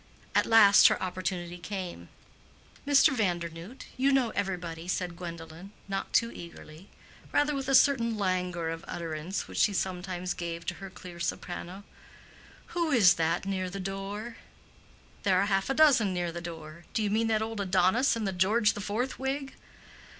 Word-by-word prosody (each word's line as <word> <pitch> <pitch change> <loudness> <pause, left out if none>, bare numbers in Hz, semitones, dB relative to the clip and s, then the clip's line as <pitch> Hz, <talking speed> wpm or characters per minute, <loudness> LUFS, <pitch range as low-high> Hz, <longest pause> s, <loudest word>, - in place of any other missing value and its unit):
At - - +3
last 210 -3 +8
her - - +1
opportunity 180 -1 -4
came. 185 -1 -6 0.8
"Mr. 275 -1 +5
Vandernoodt, 175 +2 -3
you 270 +2 +3
know 260 -4 +2
everybody," 175 -3 -4
said 180 -1 -2
Gwendolen, 170 +2 -9
not 195 0 -3
too 230 0 +2
eagerly, 170 +1 -11 0.4
rather 290 +1 +2
with 275 -1 -3
a 270 - +4
certain 235 -4 +4
languor 180 -4 -1
of 165 0 -5
utterance 165 +2 -4
which - - -5
she 205 - +4
sometimes 180 -1 -3
gave 170 -1 -5
to 185 - -2
her 195 - -7
clear 180 -2 -11
soprano. 175 +3 -5 0.9
"Who 340 -2 0
is 215 - +6
that 165 +3 0
near 190 -1 -2
the 195 +2 -6
door?" 195 +4 -5 0.8
"There 185 -2 +3
are - - +2
half 195 +1 0
a 270 - 0
dozen 255 -11 +5
near 175 -1 -1
the 170 +1 -6
door. 165 -1 -9
Do 220 - +1
you 205 - 0
mean 225 +2 +1
that 220 -1 +1
old 220 -1 -4
Adonis 190 +7 +3
in 225 -2 -2
the 195 - -1
George 210 +4 +3
the 205 - -6
Fourth 230 +6 -2
wig?" 270 +1 -3
190 Hz, 165 wpm, -29 LUFS, 175-225 Hz, 0.9 s, last